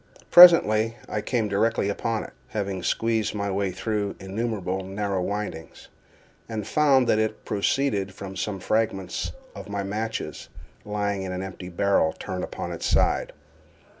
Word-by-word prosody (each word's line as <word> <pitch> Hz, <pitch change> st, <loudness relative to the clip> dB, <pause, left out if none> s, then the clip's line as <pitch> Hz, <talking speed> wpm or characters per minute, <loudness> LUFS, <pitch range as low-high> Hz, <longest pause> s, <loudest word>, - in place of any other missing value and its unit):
Presently 115 Hz, -11 st, +8 dB
I 105 Hz, -, -2 dB
came 115 Hz, -2 st, 0 dB
directly 105 Hz, +1 st, +1 dB
upon 110 Hz, +2 st, -1 dB
it -, -, -11 dB
(having 100 Hz, -1 st, -3 dB
squeezed 110 Hz, +2 st, 0 dB
my 100 Hz, -1 st, -2 dB
way 100 Hz, 0 st, 0 dB
through 105 Hz, +2 st, -2 dB
innumerable 95 Hz, -1 st, -3 dB
narrow 100 Hz, 0 st, -2 dB
windings), 100 Hz, -4 st, -5 dB, 0.6 s
and 110 Hz, -3 st, -4 dB
found 135 Hz, 0 st, +4 dB
that 110 Hz, -, +3 dB
it 110 Hz, 0 st, -2 dB
proceeded 100 Hz, -1 st, 0 dB
from 95 Hz, 0 st, -8 dB
some 95 Hz, +1 st, -3 dB
fragments 95 Hz, -2 st, -1 dB, 0.2 s
of -, -, -9 dB
my 100 Hz, -1 st, -2 dB
matches 110 Hz, +3 st, -4 dB, 0.4 s
lying 105 Hz, -1 st, -2 dB
in 95 Hz, -1 st, -4 dB
an 90 Hz, +1 st, -3 dB
empty 90 Hz, -1 st, -7 dB
barrel 90 Hz, -3 st, +2 dB
turned 95 Hz, -2 st, -5 dB
upon -, -, -5 dB
its -, -, -3 dB
side. -, -, +2 dB
100 Hz, 145 wpm, -25 LUFS, 95-110 Hz, 0.6 s, Presently